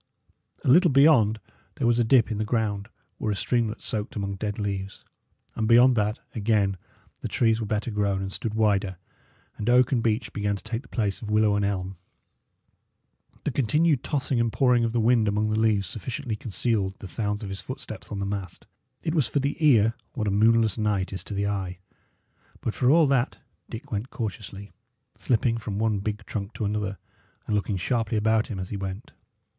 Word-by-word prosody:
A - - -1
little 175 +7 +6
beyond 135 -6 +5 0.4
there - - -2
was 120 0 +3
a - - +4
dip 115 0 +4
in 105 - -2
the - - +1
ground, 105 -2 -1 0.3
where 110 - -1
a - - -1
streamlet 115 +1 -1
soaked 105 -1 -4
among 100 -1 -2
dead 105 +1 -4
leaves; 100 -2 -4 0.5
and 110 - -1
beyond 120 +2 +6
that, 105 0 +1 0.2
again, 105 -3 +1 0.4
the - - -3
trees 115 -1 +2
were 110 - -3
better 105 +3 -1
grown 100 -2 0
and 95 0 -4
stood 110 -2 -3
wider, 100 -4 +1 0.6
and 105 - -2
oak 125 0 +5
and 125 -4 +2
beech 115 +1 -1
began 105 -1 -1
to 100 - -8
take 115 +1 -3
the 130 - -19
place 105 -4 -2
of 110 - -6
willow 105 -1 +3
and 105 - +1
elm. 95 -2 -3 1.5
The 150 - -1
continued 145 +3 +2
tossing 140 -4 -1
and 115 -1 +1
pouring 125 -2 +3
of 115 - 0
the 120 - 0
wind 115 -1 +3
among 105 +1 +1
the 110 - +1
leaves 110 -3 +2
sufficiently 120 +2 -4
concealed 105 -2 -1
the 100 - -9
sounds 105 +2 -2
of 100 - -5
his 95 0 -5
footsteps 130 -6 -8
on 105 - -3
the 100 - -2
mast; 100 -2 -5 0.4
it 160 - -1
was 150 -8 +2
for 115 - 0
the 140 +1 -1
ear 115 -7 +5 0.2
what 110 -3 -2
a - - +1
moonless 110 +1 +3
night 100 -3 0
is 95 - -4
to 105 - -5
the 100 +1 0
eye; 95 -3 -2 0.8
but 110 - -2
for 125 - +2
all 160 +2 +6
that 135 -3 +1 0.3
Dick 115 - -8
went 110 +4 -3
cautiously, 100 -2 -6 0.5
slipping 115 -1 +1
from 105 -3 -4
one 110 -1 +1
big 105 0 -4
trunk 105 0 -5
to 110 - -3
another, 100 -1 -2 0.5
and 105 - -1
looking 100 -1 -1
sharply 115 +3 0
about 110 +1 +2
him 105 - -5
as 95 0 -5
he 105 - -4
went. 95 +4 -6
110 Hz, 200 wpm, -26 LUFS, 100-120 Hz, 1.5 s, little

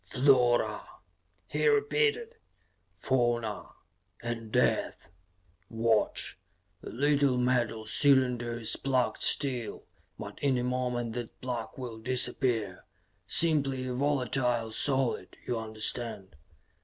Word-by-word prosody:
"Flora," 125 -2 +3 0.6
he - - -1
repeated. 445 +1 +1 0.6
"Fauna. 120 -4 -1 0.5
And 115 -2 -5
death. 85 - 0 0.6
Watch! 115 -4 0 0.4
The - - -8
little 140 0 +2
metal 120 -3 0
cylinder 125 -2 +2
is 115 -2 0
plugged 130 -2 -1
still, 125 -6 -1 0.3
but - - -9
in 135 -3 +1
a 120 - -1
moment 125 -2 -2
that 120 -1 -7
plug 120 -3 -5
will 120 -4 -7
disappear 120 -4 0 0.4
simply 140 -6 +4
a 125 - -3
volatile 125 -4 0
solid, 130 -6 -1
you 120 - -2
understand. 110 -3 -3
125 Hz, 100 wpm, -29 LUFS, 115-135 Hz, 0.6 s, simply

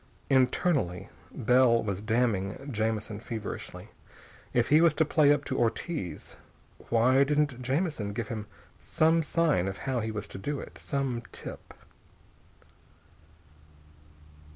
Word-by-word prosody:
Internally, 130 - +1 0.2
Bell 125 -1 +3
was 100 -2 -3
damning 110 +2 -1
Jamison 110 -1 -2
feverishly. 110 -2 -6 0.6
If 120 -1 +1
he 150 +2 +6
was 165 -3 +4
to 160 - +3
play 150 -1 +4
up 145 -1 +1
to 130 - -2
Ortiz, 115 - -3 0.5
why 125 +4 +4
didn't 145 -3 0
Jamison 130 - -1
give 110 +1 -4
him 110 -3 -5 0.3
some 160 +1 +2
sign 155 - +1
of 95 - -4
how 130 -2 0
he 110 -1 -2
was 110 -2 -5
to - - -7
do 145 +7 -3
it? - - -10
Some 135 -4 -2
tip.... - - -9
125 Hz, 125 wpm, -29 LUFS, 110-145 Hz, 0.6 s, he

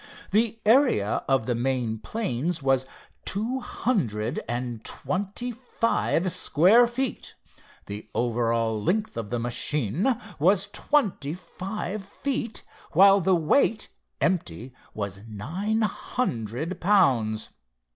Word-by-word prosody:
The 225 +2 +2
area 220 - +3
of 135 -4 +3
the 125 - 0
main 120 -2 -1
planes 165 - -2
was 135 -1 +2 0.4
two 225 +7 -1
hundred 125 - -1
and 120 -2 -3
twenty 205 +6 -3
five 230 -6 0
square 200 +13 +5
feet. 255 +1 -3 0.5
The 105 +2 -7
over 120 -1 +1
all 115 -2 0
length 215 - 0
of 115 -3 -4
the 120 - -1
machine 145 - 0 0.2
was 185 +6 +4
twenty 195 - 0
five 190 +3 -5
feet, 235 +2 -3 0.3
while 195 +3 +7
the 185 +1 +3
weight 210 - +2 0.3
empty, 130 - -1 0.2
was 100 -2 -4
nine 185 - -2
hundred 155 - -2
pounds. 130 - +3
165 Hz, 110 wpm, -26 LUFS, -, 0.5 s, while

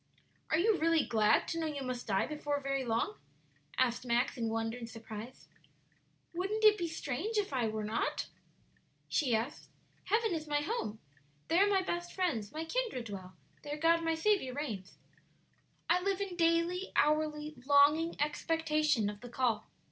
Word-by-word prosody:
"Are 315 - +3
you 395 +3 +3
really 330 -1 +3
glad 215 -2 +3
to 330 - -2
know 320 - -1
you 285 -3 -4
must 255 -1 -4
die 195 -2 +2
before 295 0 -2
very 275 -1 -1
long?" 230 - -1 0.6
asked 250 -2 +2
Max, 240 +1 +1
in 230 -2 -1
wonder 225 +1 -1
and 235 -2 -7
surprise. 225 +1 -9 0.9
"Wouldn't 390 +5 -2
it 425 -1 +8
be 350 -4 -2
strange 325 - -3
if 400 -8 0
I 245 -4 +1
were 215 0 -3
not?" 215 +2 -1 0.8
she 255 -6 +2
asked; 230 +6 -3 0.4
"heaven 445 -2 +2
is 310 -2 -3
my 295 0 +1
home. 295 - -2 0.5
"'There 385 +5 +5
my 385 -2 +3
best 345 -1 -3
friends, 270 - -1
my 315 +1 -4
kindred 445 - -2
dwell, 190 -3 -8 0.3
There 295 0 -5
God 330 +2 +3
my 325 0 +1
Saviour 320 -7 +1
reigns.' 220 -11 -5 0.9
"I 355 +2 +3
live 395 0 0
in 395 -3 -3
daily, 335 +2 +1
hourly 300 0 +1
longing 295 +4 +5
expectation 305 -4 +1
of 205 0 -5
the 245 - -9
call." 235 -3 0
300 Hz, 165 wpm, -33 LUFS, 240-335 Hz, 0.9 s, it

